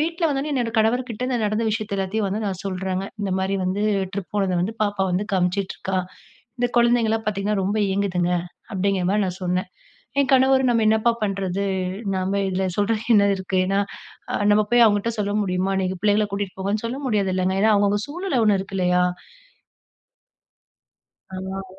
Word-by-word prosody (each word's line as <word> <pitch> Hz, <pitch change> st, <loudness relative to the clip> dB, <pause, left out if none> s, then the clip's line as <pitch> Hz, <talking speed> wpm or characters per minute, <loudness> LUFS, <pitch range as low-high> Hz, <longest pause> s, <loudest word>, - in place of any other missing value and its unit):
வீட்ல 330 Hz, +2 st, -1 dB
வந்த 275 Hz, -2 st, 0 dB
உடனே 300 Hz, -, -3 dB
என்னோட 240 Hz, -4 st, 0 dB
கணவர் 225 Hz, +3 st, +3 dB
கிட்ட 235 Hz, +2 st, -4 dB, 0.2 s
நடந்த 215 Hz, +2 st, 0 dB
விஷயத்த 215 Hz, -1 st, -3 dB
எல்லாத்தையு 195 Hz, +3 st, -1 dB
வந்து 200 Hz, +3 st, -2 dB
நா 205 Hz, -, 0 dB, 0.2 s
சொல்றங்க. 190 Hz, 0 st, -2 dB, 0.2 s
"இந்த 200 Hz, -2 st, -2 dB
மாரி 190 Hz, +1 st, -1 dB
வந்து 190 Hz, +3 st, -1 dB, 0.3 s
ட்ரிப் 195 Hz, -2 st, -5 dB
போனத 195 Hz, -3 st, +1 dB
வந்து 190 Hz, +6 st, -1 dB
பாப்பா 205 Hz, -2 st, 0 dB
வந்து 185 Hz, +3 st, 0 dB
காமிச்சிட்டுருக்கா 190 Hz, 0 st, -1 dB, 0.6 s
இந்த 245 Hz, -, +2 dB
குழந்தைங்கலா 235 Hz, -2 st, +3 dB
பார்த்தீங்கன்னா 205 Hz, 0 st, 0 dB
ரொம்ப 200 Hz, +3 st, -1 dB, 0.2 s
ஏங்குதுங்க" 180 Hz, -3 st, 0 dB, 0.4 s
அப்படிங்கிற 195 Hz, -1 st, 0 dB
மாரி 210 Hz, +1 st, +2 dB
நா 185 Hz, -, -1 dB
சொன்னே. 180 Hz, +1 st, 0 dB, 0.6 s
ஏங் 275 Hz, -1 st, +2 dB
கணவரு 265 Hz, 0 st, +5 dB
நம்ம 230 Hz, -2 st, +2 dB
என்னப்பா 220 Hz, +2 st, +3 dB
பண்றது, 195 Hz, -1 st, -1 dB, 0.5 s
நாம 190 Hz, +2 st, 0 dB
இதுல 190 Hz, +1 st, -1 dB
சொல்றதுக்கு 220 Hz, +3 st, +1 dB
என்ன 200 Hz, 0 st, +5 dB
இருக்கு. 190 Hz, 0 st, -1 dB
ஏன்னா 195 Hz, +1 st, +1 dB, 0.7 s
நம்ம 210 Hz, +1 st, +4 dB
போய் 240 Hz, -1 st, +7 dB
அவங்கிட்ட 205 Hz, +2 st, +1 dB
சொல்ல 205 Hz, 0 st, -1 dB
முடியுமா 185 Hz, +1 st, 0 dB
'நீங்க 185 Hz, 0 st, -2 dB
பிள்ளைங்கள 210 Hz, 0 st, +3 dB
கூட்டிட்டு 200 Hz, -2 st, -3 dB
போங்கன்னு' 205 Hz, +3 st, -1 dB
சொல்ல 250 Hz, +4 st, -3 dB
முடியாதுல்லங்க 190 Hz, -4 st, +1 dB
ஏனா 220 Hz, 0 st, +5 dB
அவங்கவுங்க 205 Hz, 0 st, +2 dB
சூழ்நில 310 Hz, -4 st, -1 dB
ஒண்ணு 200 Hz, -2 st, +4 dB
இருக்கில்லையா. 180 Hz, -2 st, +1 dB, 2.3 s
ஆனால 190 Hz, +1 st, -5 dB
200 Hz, 160 wpm, -23 LUFS, 190-220 Hz, 2.3 s, போய்